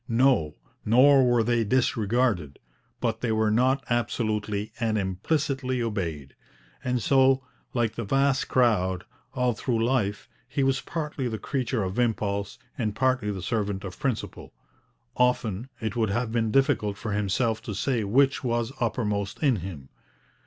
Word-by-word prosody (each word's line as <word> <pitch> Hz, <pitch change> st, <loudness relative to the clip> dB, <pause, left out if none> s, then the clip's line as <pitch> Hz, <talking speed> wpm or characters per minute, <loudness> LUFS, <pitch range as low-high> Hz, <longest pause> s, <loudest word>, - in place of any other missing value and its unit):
No; 115 Hz, -, +3 dB, 0.3 s
nor 135 Hz, +5 st, +6 dB
were 120 Hz, -2 st, +3 dB
they 120 Hz, 0 st, +2 dB
disregarded; 110 Hz, -, +1 dB, 0.4 s
but 115 Hz, -2 st, -1 dB
they 115 Hz, -, 0 dB
were 110 Hz, -1 st, +2 dB
not 130 Hz, +4 st, +2 dB
absolutely 110 Hz, -3 st, -1 dB
and 110 Hz, -2 st, +1 dB
implicitly 130 Hz, -, -1 dB
obeyed. 85 Hz, -, -3 dB, 0.5 s
And 125 Hz, -1 st, 0 dB
so, 135 Hz, -1 st, +4 dB, 0.3 s
like 115 Hz, -3 st, +1 dB
the 115 Hz, -, -4 dB
vast 135 Hz, +4 st, +1 dB
crowd, 100 Hz, -8 st, +2 dB, 0.3 s
all 125 Hz, -1 st, +1 dB
through 115 Hz, 0 st, -1 dB
life 110 Hz, -5 st, 0 dB, 0.2 s
he 135 Hz, +2 st, -1 dB
was 135 Hz, 0 st, +1 dB
partly 150 Hz, -5 st, -3 dB
the 110 Hz, -2 st, -3 dB
creature 125 Hz, -3 st, -2 dB
of 95 Hz, +5 st, -3 dB
impulse 100 Hz, -4 st, -1 dB, 0.2 s
and 110 Hz, -4 st, -1 dB
partly 130 Hz, -4 st, +1 dB
the 95 Hz, -3 st, -4 dB
servant 100 Hz, -2 st, -2 dB
of 95 Hz, -2 st, -8 dB
principle. 135 Hz, -6 st, -3 dB, 0.6 s
Often 125 Hz, -2 st, +1 dB
it 110 Hz, +1 st, -3 dB
would 110 Hz, -3 st, +1 dB
have 115 Hz, +3 st, -1 dB
been 115 Hz, -1 st, +1 dB
difficult 105 Hz, -5 st, +1 dB
for 110 Hz, -, -4 dB
himself 105 Hz, +3 st, 0 dB
to 105 Hz, -, -6 dB
say 120 Hz, +2 st, 0 dB
which 135 Hz, +8 st, +2 dB
was 120 Hz, -1 st, -1 dB
uppermost 105 Hz, -2 st, -1 dB
in 135 Hz, -6 st, +4 dB
him. 85 Hz, -7 st, -8 dB
115 Hz, 145 wpm, -26 LUFS, 105-130 Hz, 0.6 s, nor